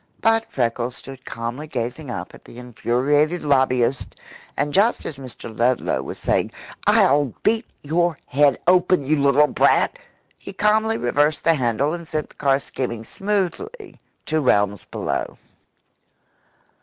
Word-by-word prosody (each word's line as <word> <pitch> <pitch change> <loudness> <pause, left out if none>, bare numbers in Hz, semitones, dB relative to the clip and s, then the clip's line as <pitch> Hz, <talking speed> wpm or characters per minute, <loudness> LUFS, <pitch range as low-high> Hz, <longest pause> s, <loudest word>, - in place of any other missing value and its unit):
But 225 0 +2
Freckles 120 0 -1
stood 135 -1 -11
calmly 120 +6 -5
gazing 130 +2 -4
up - - -6
at - - -15
the - - -13
infuriated 135 +7 0
lobbyist, 130 -3 +1 0.4
and 145 0 -1
just 210 +5 +2
as 140 - -6
Mr. 120 -3 -10
Ludlow 120 +2 +1
was - - -7
saying, - - 0 0.4
"I'll 140 -2 +4
beat 225 +2 +1 0.2
your 165 +2 +1
head 140 0 +3
open, 180 -3 +3
you 155 +3 +2
little 140 +1 +5
brat!" - - +2 0.4
he - - -9
calmly 215 +3 +2
reversed 145 +5 +1
the 165 - +4
handle 130 +1 0
and 170 -1 -6
sent 155 -1 -3
the - - -21
car 135 -2 +2
skimming 120 -4 -5
smoothly 205 - -3 0.3
to 155 0 0
realms 105 -6 +1
below. - - -3
145 Hz, 140 wpm, -22 LUFS, 125-170 Hz, 0.4 s, little